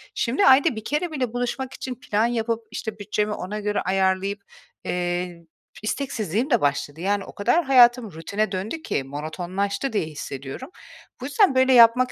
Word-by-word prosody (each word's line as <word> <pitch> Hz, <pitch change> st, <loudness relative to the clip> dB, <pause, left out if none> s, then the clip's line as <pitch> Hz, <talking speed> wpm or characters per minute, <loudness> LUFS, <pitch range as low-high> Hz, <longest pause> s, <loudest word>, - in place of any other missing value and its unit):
Şimdi 265 Hz, +12 st, +1 dB
ayda 265 Hz, -2 st, +6 dB
1 220 Hz, -, -6 dB
kere 300 Hz, +7 st, -1 dB
bile 255 Hz, -6 st, -2 dB
buluşmak 245 Hz, +2 st, -3 dB
için 255 Hz, -1 st, -6 dB
plan 220 Hz, -2 st, 0 dB
yapıp, 230 Hz, -1 st, -2 dB
işte, 220 Hz, -1 st, -5 dB
bütçemi 210 Hz, +1 st, -1 dB
ona 210 Hz, +2 st, -5 dB
göre 210 Hz, 0 st, -1 dB
ayarlayıp, 190 Hz, +1 st, 0 dB, 0.4 s
eee, 175 Hz, -1 st, -3 dB, 0.4 s
isteksizliğim 225 Hz, -, -2 dB
de 240 Hz, -6 st, +3 dB
başladı. 145 Hz, +2 st, -1 dB
Yani, 200 Hz, +1 st, 0 dB
o -, -, -12 dB
kadar 315 Hz, +12 st, +2 dB
hayatım 240 Hz, -4 st, +5 dB
rutine 200 Hz, +6 st, -2 dB
döndü 205 Hz, +12 st, -4 dB
ki 140 Hz, -, -2 dB
monotonlaştı 180 Hz, -, -3 dB
diye 205 Hz, -, 0 dB
hissediyorum. 145 Hz, -, -7 dB, 0.5 s
Bu -, -, -4 dB
yüzden, 290 Hz, +2 st, +3 dB
böyle, 260 Hz, 0 st, +4 dB
yapmak 245 Hz, +1 st, +6 dB
215 Hz, 160 wpm, -24 LUFS, 185-255 Hz, 0.5 s, ayda